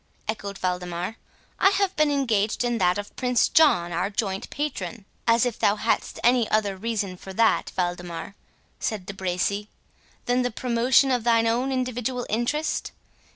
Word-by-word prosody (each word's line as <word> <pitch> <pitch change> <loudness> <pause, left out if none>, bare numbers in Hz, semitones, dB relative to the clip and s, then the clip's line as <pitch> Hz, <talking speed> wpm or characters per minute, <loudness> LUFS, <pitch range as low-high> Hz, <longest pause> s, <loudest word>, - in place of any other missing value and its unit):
echoed 200 -2 -4
Waldemar; 180 +3 -2 0.4
"I 385 - +6
have 395 -1 0
been 305 -1 +3
engaged 230 -7 +1
in 240 -1 0
that 180 0 +3
of 205 0 -6
Prince 250 -2 +2
John, 180 - +4
our 175 +4 -1
joint 195 -2 -3
patron." 230 - -4 0.2
"As 230 +2 +4
if 245 -3 -3
thou 205 - +3
hadst 220 +2 -1
any 240 -1 +4
other 205 -2 +1
reason 205 -2 -2
for 190 +1 -9
that, 225 +3 +2
Waldemar," 175 0 -3 0.5
said 210 -4 -3
De 200 - -6
Bracy, 190 +2 -1 0.6
"than 245 +1 +2
the 245 - 0
promotion 250 +3 +2
of 245 -3 +1
thine 230 -1 +3
own 245 +4 +1
individual 250 -1 -2
interest? 240 +8 -1
225 Hz, 155 wpm, -25 LUFS, 195-250 Hz, 0.6 s, I